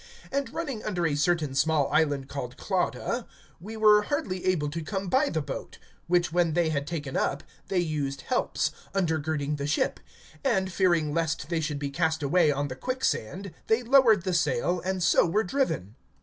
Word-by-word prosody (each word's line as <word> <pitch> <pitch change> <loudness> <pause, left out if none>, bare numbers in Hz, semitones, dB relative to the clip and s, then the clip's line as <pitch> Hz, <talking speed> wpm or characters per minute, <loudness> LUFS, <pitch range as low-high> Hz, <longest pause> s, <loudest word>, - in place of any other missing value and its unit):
(16)And 280 0 -1
running 275 -9 -4
under 180 -5 -1
a 155 - +1
certain 150 -1 +1
small 150 +1 +2
island 145 -4 +2
called 125 -3 -6
Clauda, 210 +5 -1 0.3
we 215 +6 -8
were 210 -1 +6
hardly 210 - -2
able 175 -6 +1
to 160 +3 -4
come 195 +4 -4
by 270 +6 +3
the 160 -2 -1
boat; 140 - -7 0.3
(17)which 175 -2 +2
when 170 -2 +2
they 170 -1 +2
had 140 -2 -2
taken 150 -5 -4
up, 140 - 0 0.2
they 195 - -1
used 145 -5 -1
helps, 255 - 0 0.2
undergirding 155 -5 0
the 140 0 -3
ship; 150 - 0 0.4
and, 190 -9 +1
fearing 170 -6 +2
lest 160 -3 -1
they 170 -2 0
should 155 -2 -2
be 140 -1 -4
cast 160 +1 0
away 155 +2 +4
on 145 0 -1
the 130 - -6
quicksand, 195 - -2
they 225 +3 +2
lowered 235 -6 +5
the 185 -1 -1
sail, 160 +2 +1
and 185 -1 -1
so 170 - +5
were 205 +6 +1
driven. 170 - -1
170 Hz, 180 wpm, -27 LUFS, 145-195 Hz, 0.4 s, were